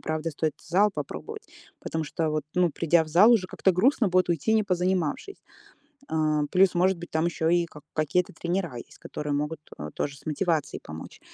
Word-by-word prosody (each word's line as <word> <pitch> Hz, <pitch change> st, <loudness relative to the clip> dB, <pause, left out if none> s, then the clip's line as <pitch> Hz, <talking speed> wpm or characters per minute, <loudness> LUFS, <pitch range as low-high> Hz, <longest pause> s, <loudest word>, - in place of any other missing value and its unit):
правда 155 Hz, +1 st, -2 dB
стоит 155 Hz, 0 st, -2 dB
зал 195 Hz, +5 st, +2 dB
попробовать. 445 Hz, -, -6 dB, 0.3 s
Потому 160 Hz, -, -3 dB
что 160 Hz, +1 st, -2 dB
вот, 155 Hz, 0 st, -1 dB
ну, 180 Hz, -2 st, +3 dB
придя 165 Hz, +2 st, +2 dB
в 155 Hz, -, -12 dB
зал, 185 Hz, +9 st, +6 dB
уже 195 Hz, -6 st, +3 dB
как-то 190 Hz, -, +1 dB
грустно 225 Hz, +3 st, +3 dB
будет 185 Hz, 0 st, +2 dB
уйти, 170 Hz, +5 st, +1 dB
не 220 Hz, -, +4 dB
позанимавшись. 185 Hz, -, -1 dB, 0.7 s
А, 155 Hz, -1 st, +1 dB
плюс, 185 Hz, -1 st, +4 dB
может 180 Hz, +1 st, +2 dB
быть, 175 Hz, -, -9 dB
там 160 Hz, +1 st, +1 dB
ещё 165 Hz, -1 st, -1 dB
и 175 Hz, 0 st, +3 dB
ка 150 Hz, -2 st, -13 dB
какие-то 160 Hz, +4 st, 0 dB
тренера 170 Hz, -4 st, -3 dB
есть, 120 Hz, -, -11 dB
которые 150 Hz, -1 st, -5 dB
могут, 150 Hz, +2 st, -2 dB, 0.2 s
э, 75 Hz, +1 st, -6 dB
тоже 140 Hz, 0 st, -3 dB
с -, -, -21 dB
мотивацией 155 Hz, 0 st, -1 dB
помочь. 80 Hz, +1 st, -10 dB
170 Hz, 190 wpm, -26 LUFS, 155-185 Hz, 0.7 s, зал